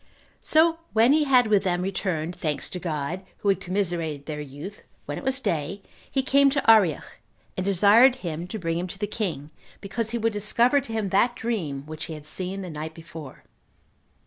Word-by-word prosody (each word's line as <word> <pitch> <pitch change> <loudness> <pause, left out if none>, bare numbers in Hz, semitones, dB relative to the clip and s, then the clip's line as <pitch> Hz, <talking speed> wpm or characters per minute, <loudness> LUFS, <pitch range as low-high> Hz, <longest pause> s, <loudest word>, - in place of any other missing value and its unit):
So 325 +1 +3
when 230 +5 +5
he 305 0 +3
had 255 -3 +5
with 210 -2 +3
them 180 -1 0
returned 180 -3 -2
thanks 155 -4 -3
to 180 - -4
God, 160 +1 -3 0.2
who 205 - -1
had 195 - +2
commiserated 170 -6 -2
their 150 -1 -5
youth, 150 +9 -9 0.2
when - - -4
it - - -11
was 265 +1 +1
day 175 - -2 0.3
he 270 - 0
came 280 +1 +5
to 280 -2 -1
Arioch, 190 - +2 0.4
and 185 - -2
desired 205 +7 +6
him 165 +1 -4
to 220 - -5
bring 165 -3 -2
him 180 - -3
to 190 - -8
the 205 - -1
king, 180 -9 -4 0.3
because 210 +3 -3
he 235 - -2
would 225 -1 0
discover 235 +6 +3
to 245 - -10
him 220 -3 -1
that 235 +6 +2
dream 165 -14 -3
which 155 0 -6
he 160 - -6
had 150 -1 -11
seen 190 +4 -4
the 180 - -6
night 155 +1 -6
before. 160 -4 -10
190 Hz, 200 wpm, -25 LUFS, 160-225 Hz, 0.4 s, desired